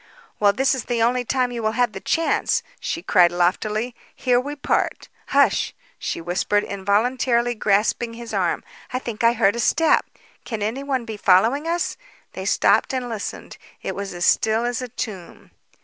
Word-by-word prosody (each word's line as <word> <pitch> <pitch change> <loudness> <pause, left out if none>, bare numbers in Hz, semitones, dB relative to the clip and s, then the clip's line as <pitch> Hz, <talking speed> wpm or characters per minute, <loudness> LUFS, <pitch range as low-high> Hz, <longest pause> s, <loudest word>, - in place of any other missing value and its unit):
"Well, 205 -1 +5
this 265 +7 +2
is 260 -3 -3
the 235 -2 0
only 245 +2 +2
time 250 0 0
you 235 -1 -4
will 220 0 0
have 245 -1 +1
the - - -7
chance," 330 -1 +1 0.2
she 335 - -4
cried 175 -3 +5
loftily. 210 +7 0 0.2
"Here 245 -2 +2
we 285 +3 -4
part. 285 - -1 0.2
Hush!" - - +2 0.2
she - - -3
whispered, 180 +4 0
involuntarily 235 +5 +1
grasping 220 +2 +1
his 235 0 -8
arm. - - 0 0.3
"I 255 - -1
think 235 -3 -5
I 230 0 +5
heard 200 -2 +2
a - - -3
step. 320 +7 +3 0.4
Can 220 -4 -4
anyone 260 +3 -2
be 220 -2 -6
following 225 - +3
us?" 340 +1 -1 0.4
They - - -6
stopped 265 - +3
and 250 -1 -3
listened. 220 -3 -6 0.2
It - - -3
was 200 -1 -5
as 175 0 -1
still 220 +2 +3
as 245 +1 -2
a 250 - -4
tomb. 215 -7 -7
235 Hz, 175 wpm, -22 LUFS, 205-250 Hz, 0.4 s, Well